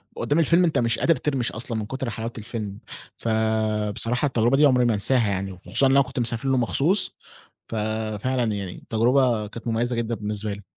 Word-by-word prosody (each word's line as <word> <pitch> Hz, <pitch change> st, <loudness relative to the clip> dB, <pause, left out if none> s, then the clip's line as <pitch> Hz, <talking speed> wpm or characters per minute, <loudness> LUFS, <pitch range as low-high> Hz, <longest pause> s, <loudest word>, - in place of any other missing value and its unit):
قدام 145 Hz, +3 st, 0 dB
الفيلم 170 Hz, +3 st, +4 dB
أنت 165 Hz, -3 st, +2 dB
مش 115 Hz, -1 st, 0 dB
قادر 165 Hz, -, +3 dB
ترمِش 135 Hz, -6 st, -1 dB
أصلًا 115 Hz, 0 st, -4 dB
من 110 Hz, -, -3 dB
كُتر 130 Hz, +2 st, -4 dB
حلاوة 115 Hz, +2 st, -5 dB
الفيلم، 105 Hz, -2 st, -6 dB, 0.4 s
فبصراحة 110 Hz, +2 st, 0 dB
التجربة 120 Hz, -1 st, +2 dB
دي 150 Hz, -, +6 dB
عمري 125 Hz, -3 st, +4 dB
ما 120 Hz, -, +2 dB
هانساها 115 Hz, +3 st, +2 dB
يعني، 95 Hz, 0 st, -2 dB
وخصوصًا 95 Hz, +8 st, 0 dB
إن -, -, +2 dB
أنا 140 Hz, +1 st, +6 dB
كنت 130 Hz, -1 st, -4 dB
مسافر 120 Hz, +2 st, -2 dB
له 135 Hz, -, +2 dB
مخصوص، 160 Hz, -, +1 dB, 0.5 s
ففعلًا 110 Hz, +3 st, -2 dB
يعني 100 Hz, -3 st, -5 dB
التجربة 120 Hz, -1 st, +1 dB
كانت 115 Hz, +3 st, -10 dB
مُميَّزَة 120 Hz, +2 st, 0 dB
جدًا 115 Hz, 0 st, -1 dB
بالنسبة 105 Hz, 0 st, -3 dB
لي. 100 Hz, +1 st, -8 dB
115 Hz, 185 wpm, -24 LUFS, 110-130 Hz, 0.5 s, دي